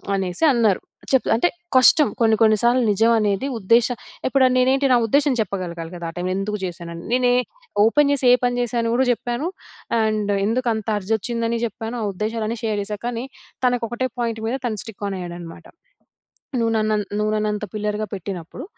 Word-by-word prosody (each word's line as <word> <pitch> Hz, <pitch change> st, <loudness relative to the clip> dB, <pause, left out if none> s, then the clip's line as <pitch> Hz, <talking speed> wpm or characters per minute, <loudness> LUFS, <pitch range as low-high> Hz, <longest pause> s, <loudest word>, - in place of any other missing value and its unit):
అనేసి 190 Hz, -, 0 dB
అన్నారు. 220 Hz, -5 st, +2 dB, 0.3 s
చెప్తా 265 Hz, -2 st, +2 dB
అంటే 300 Hz, +10 st, +2 dB, 0.3 s
కష్టం, 285 Hz, +3 st, +6 dB
కొన్ని 220 Hz, -1 st, +5 dB
కొన్ని 215 Hz, -1 st, +5 dB
సార్లు 245 Hz, +2 st, +4 dB
నిజం 225 Hz, +3 st, +3 dB
అనేది 210 Hz, +4 st, 0 dB
ఉద్దేశ 230 Hz, +4 st, +4 dB, 0.4 s
ఇప్పుడు 265 Hz, 0 st, +3 dB
నేనేంటి, 265 Hz, +2 st, +3 dB
నా -, -, +6 dB
ఉద్దేశం 285 Hz, +4 st, +3 dB
చెప్పగలగాలి 175 Hz, -4 st, -4 dB
కదా, 170 Hz, -1 st, -6 dB
ఆ -, -, -23 dB
టైము 180 Hz, +1 st, -2 dB
ఎందుకు 210 Hz, +2 st, -2 dB
జేశానని. 170 Hz, -1 st, -7 dB
నేనే 250 Hz, -1 st, +3 dB, 0.5 s
ఓపెన్ 285 Hz, +5 st, +4 dB
జేసి 270 Hz, -2 st, -1 dB
ఏ -, -, +8 dB
పని 245 Hz, 0 st, +1 dB
జేశానో 235 Hz, -1 st, -1 dB
కూడా 260 Hz, +1 st, +3 dB
చెప్పాను. 240 Hz, +6 st, -3 dB, 0.5 s
అండ్ 215 Hz, -2 st, 0 dB, 0.2 s
ఎందుకంత 230 Hz, -2 st, -1 dB
అర్జ్ 205 Hz, +1 st, -6 dB
ఒచ్చిందని 230 Hz, +2 st, -2 dB
జెప్పాను. 225 Hz, +1 st, -5 dB
ఆ -, -, -1 dB
ఉద్దేశాలన్నీ 220 Hz, +3 st, -2 dB
షేర్ 215 Hz, -2 st, 0 dB
చేశా. 210 Hz, +1 st, -4 dB
కానీ, 240 Hz, 0 st, -3 dB, 0.4 s
తనకొకటే 245 Hz, 0 st, 0 dB
పాయింట్ 230 Hz, -2 st, -1 dB
మీద 245 Hz, -, -1 dB
తను 220 Hz, -3 st, -2 dB
స్టిక్ 215 Hz, -2 st, -10 dB
ఆన్ 195 Hz, -, -3 dB
అయ్యాడన్నమాట. 175 Hz, -1 st, -8 dB, 0.9 s
"నువ్వు 230 Hz, 0 st, +1 dB
నన్ను 215 Hz, 0 st, +1 dB, 0.2 s
నువ్వు 210 Hz, 0 st, 0 dB
నన్నంత 210 Hz, 0 st, -1 dB
పిల్లర్‌గా 210 Hz, 0 st, -2 dB
పెట్టినప్పుడు 190 Hz, -, -6 dB
220 Hz, 165 wpm, -22 LUFS, 200-245 Hz, 0.9 s, ఏ